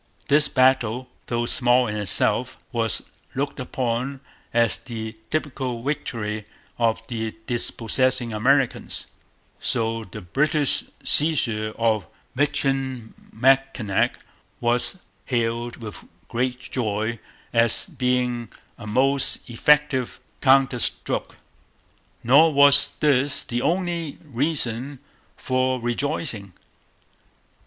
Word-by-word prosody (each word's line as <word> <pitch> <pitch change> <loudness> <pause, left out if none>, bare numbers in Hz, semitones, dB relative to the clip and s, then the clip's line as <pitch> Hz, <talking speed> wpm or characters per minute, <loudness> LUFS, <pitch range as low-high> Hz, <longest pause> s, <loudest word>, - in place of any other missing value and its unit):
This 150 +1 +4
battle, 130 -2 +2 0.2
though 120 0 -1
small 125 -1 +3
in 105 - -3
itself, 105 -4 +2
was - - 0 0.2
looked 140 +2 -2
upon 130 +1 -2 0.3
as 115 -1 +2
the 110 -2 -6
typical 130 -6 -3
victory 115 -7 -3 0.4
of 115 -1 +1
the 110 -2 -4
dispossessing 120 0 0
Americans; 130 +4 +1 0.5
so 115 -2 -1
the 105 +1 -9
British 140 - +1 0.2
seizure 115 -9 +3
of 110 -2 +1 0.3
Michilimackinac 135 -4 0 0.4
was 120 +9 0 0.3
hailed 120 -1 -1
with 110 -4 -9 0.3
great 125 +1 -1
joy 110 -2 -2 0.3
as 115 -1 +3
being 125 - -1 0.3
a 110 - -8
most 135 +5 +2
effective 140 0 +2 0.2
counter 135 -2 +4
stroke. - - -3 0.9
Nor 145 +7 +6
was 140 0 +6
this 145 -2 +2
the 120 -1 -3
only 170 -2 -1
reason 140 -2 -1 0.4
for 130 0 0
rejoicing. 120 - -2
125 Hz, 95 wpm, -23 LUFS, 115-135 Hz, 0.9 s, Nor